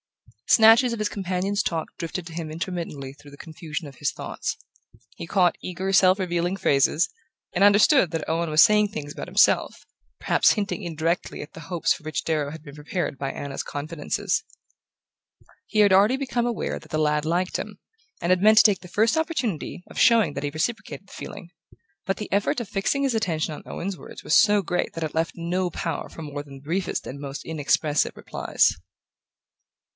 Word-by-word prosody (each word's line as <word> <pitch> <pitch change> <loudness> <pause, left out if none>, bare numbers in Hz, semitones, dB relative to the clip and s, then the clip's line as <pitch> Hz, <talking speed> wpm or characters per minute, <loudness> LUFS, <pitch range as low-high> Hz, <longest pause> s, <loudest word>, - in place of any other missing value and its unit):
Snatches 225 +3 +6
of 230 - -4
his 215 - +1
companion's 195 +1 -2
talk 165 -2 -3
drifted 170 +1 -5
to 165 - -10
him 160 -2 -5
intermittently 160 -5 -5
through 145 0 -16
the 140 - -13
confusion 160 0 -7
of 135 -3 -13
his - - 0
thoughts. - - -5 0.6
He - - -7
caught 180 -2 +3
eager 190 +2 -3
self 190 0 +5
revealing 175 0 -1
phrases, 140 +1 +2 0.5
and 185 - +2
understood 205 - +5
that 165 -2 -3
Owen 165 +1 -1
was 155 +1 +7
saying 210 -1 +4
things 145 -7 -6
about - - -7
himself, - - +2 0.3
perhaps - - +3
hinting 210 0 -3
indirectly 165 -1 -2
at 145 - -10
the 165 - -10
hopes 175 -2 +2
for - - -11
which 155 -2 -3
Darrow 155 -3 0
had 160 -1 -10
been 140 -2 -11
prepared 150 0 -3
by 135 -1 -2
Anna's 140 -1 -5
confidences. 150 +2 -2 1.2
He 215 - -1
had 205 -2 +6
already 205 +7 +5
become 250 -3 -1
aware 235 - -3
that - - -17
the 155 - 0
lad 150 -1 +1
liked 175 +3 -1
him, - - -7 0.4
and 170 - +1
had 185 0 +3
meant 215 +1 +6
to - - +9
take 205 -4 +4
the 180 - -12
first 220 +6 +2
opportunity 255 - -2
of - - -7
showing 225 - +5
that 140 - -5
he 145 - -1
reciprocated 200 +6 -4
the - - -15
feeling. 175 - -9 0.5
But 195 - -1
the 210 - -7
effort 200 +5 +1
of 235 - -5
fixing 220 +8 -1
his 265 -4 +1
attention 165 -8 -1
on - - -9
Owen's 190 +1 -4
words - - -11
was - - +2
so 210 -2 +5
great 180 - -2
that 165 - -4
it 155 - -4
left 165 +1 0
no 175 +2 -1
power 165 -1 -4
for 165 - -9
more 145 -1 -6
than 140 -1 -12
the 135 - -13
briefest 180 +5 -2
and 140 +2 -7
most 140 0 -7
inexpressive 150 -1 +1
replies. - - +1
175 Hz, 195 wpm, -24 LUFS, 155-200 Hz, 1.2 s, to